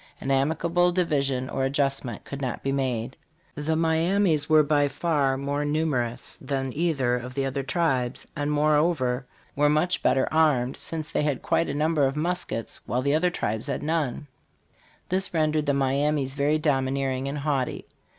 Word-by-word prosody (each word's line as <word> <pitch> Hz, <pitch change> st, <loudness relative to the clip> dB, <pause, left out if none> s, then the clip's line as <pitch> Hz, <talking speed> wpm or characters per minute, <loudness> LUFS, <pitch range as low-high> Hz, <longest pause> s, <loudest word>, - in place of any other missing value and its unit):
An 135 Hz, -, -3 dB
amicable 165 Hz, +6 st, +2 dB
division 140 Hz, -7 st, 0 dB
or 135 Hz, -, -2 dB
adjustment 135 Hz, -2 st, -1 dB
could 140 Hz, 0 st, -7 dB
not 130 Hz, -3 st, -3 dB
be 135 Hz, -, 0 dB
made. 130 Hz, -3 st, -2 dB, 0.4 s
The 150 Hz, +2 st, -1 dB
Miamis 165 Hz, 0 st, +2 dB
were 155 Hz, -1 st, +6 dB
by 145 Hz, -1 st, +2 dB
far 140 Hz, -2 st, 0 dB
more 140 Hz, +2 st, -2 dB
numerous 145 Hz, -6 st, -2 dB
than 135 Hz, -2 st, -2 dB
either 140 Hz, -7 st, +1 dB
of 125 Hz, +1 st, -7 dB
the 135 Hz, -1 st, 0 dB
other 135 Hz, +1 st, -2 dB
tribes, 135 Hz, -4 st, -1 dB
and 145 Hz, 0 st, -1 dB
moreover 150 Hz, -4 st, +1 dB, 0.3 s
were 145 Hz, +1 st, +3 dB
much 155 Hz, +4 st, +1 dB
better 130 Hz, -, +2 dB
armed, 145 Hz, -6 st, +3 dB
since 155 Hz, -2 st, -5 dB
they -, -, +1 dB
had 150 Hz, -3 st, -1 dB
quite 165 Hz, -, +1 dB
a 140 Hz, -, -2 dB
number 150 Hz, -1 st, +2 dB
of 135 Hz, -, -3 dB
muskets 170 Hz, -7 st, -3 dB
while 125 Hz, +1 st, -1 dB
the 140 Hz, +1 st, +2 dB
other 170 Hz, +4 st, +3 dB
tribes 110 Hz, -7 st, -3 dB
had 140 Hz, -, -3 dB
none 150 Hz, -3 st, -1 dB, 0.8 s
This 185 Hz, -1 st, 0 dB
rendered 155 Hz, -1 st, +1 dB
the 140 Hz, -, +3 dB
Miamis 140 Hz, 0 st, +1 dB
very 145 Hz, +2 st, +1 dB
domineering 135 Hz, -2 st, 0 dB
and 140 Hz, +2 st, -3 dB
haughty. 140 Hz, -3 st, -1 dB
145 Hz, 165 wpm, -26 LUFS, 135-155 Hz, 0.8 s, were